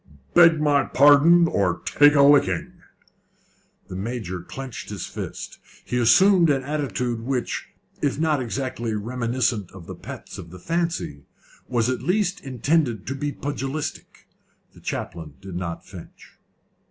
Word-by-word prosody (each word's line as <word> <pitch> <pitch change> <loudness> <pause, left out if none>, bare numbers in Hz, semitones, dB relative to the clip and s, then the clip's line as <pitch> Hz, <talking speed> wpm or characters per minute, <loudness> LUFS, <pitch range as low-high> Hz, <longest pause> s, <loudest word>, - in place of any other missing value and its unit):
"Beg 165 -2 +7
my 145 -2 +3
pardon, 145 +5 +6
or 95 - 0
take 145 +1 +5
a 140 - +6
licking!" 140 -12 +3 1.1
The - - -8
Major 95 -3 -4
clenched 130 +6 -8
his - - -5
fists. - - -7 0.3
He 125 - -1
assumed 175 - +5
an 135 -2 +1
attitude 130 -5 -2
which, 125 0 -3 0.3
if 140 -2 0
not 155 -3 +1
exactly 120 -2 -3
reminiscent 115 -2 -1
of 95 -4 -11
the - - -7
pets - - -9
of 85 - -9
the 90 - -11
fancy, 165 - -2 0.5
was 120 -3 +1
at 130 0 -1
least 195 +1 0
intended 130 - 0
to 130 - -3
be 145 +1 -3
pugilistic. 145 +1 -5 0.5
The - - -16
chaplain 80 -4 -5
did 95 -2 -9
not 85 -2 -5
flinch. 90 -3 -13
130 Hz, 140 wpm, -23 LUFS, 110-145 Hz, 1.1 s, Beg